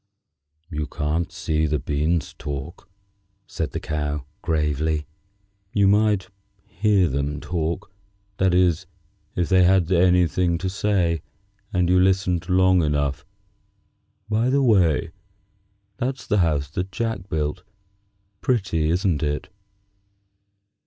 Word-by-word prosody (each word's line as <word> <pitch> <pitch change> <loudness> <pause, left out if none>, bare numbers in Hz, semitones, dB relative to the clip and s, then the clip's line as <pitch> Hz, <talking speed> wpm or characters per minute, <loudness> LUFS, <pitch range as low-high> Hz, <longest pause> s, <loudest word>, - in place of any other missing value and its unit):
"You 75 -2 -3
can't 75 +3 -2
see 80 0 -1
the 75 0 0
beans 75 +2 -1
talk," 75 +6 -7 0.6
said 80 -4 -3
the - - -4
Cow, 75 -2 -3 0.2
gravely. 75 -1 0 0.7
"You 100 -2 +4
might 105 -1 +2 0.4
hear 100 0 +2
them 70 +1 -2
talk; 85 +2 -3 0.5
that 95 -1 +3
is, 90 -3 +2 0.5
if 90 -2 0
they 95 -1 +5
had 90 -1 +3
anything 90 -1 +3
to 95 +2 -3
say, 95 -5 +1 0.5
and 90 -4 +1
you 90 +1 +4
listened 90 -2 +1
long 95 0 +4
enough. 70 -3 -1 1.0
By 110 +3 +1
the 140 +1 +2
way, 95 - +3 0.9
that's 130 +2 -3
the 105 -2 +1
house 75 -5 +1
that 90 +4 -3
Jack 110 -3 -3
built. 75 +3 -2 0.8
Pretty, 95 - 0
isn't 90 -2 +1
it?" 75 -1 -2
85 Hz, 115 wpm, -23 LUFS, 75-95 Hz, 1.0 s, they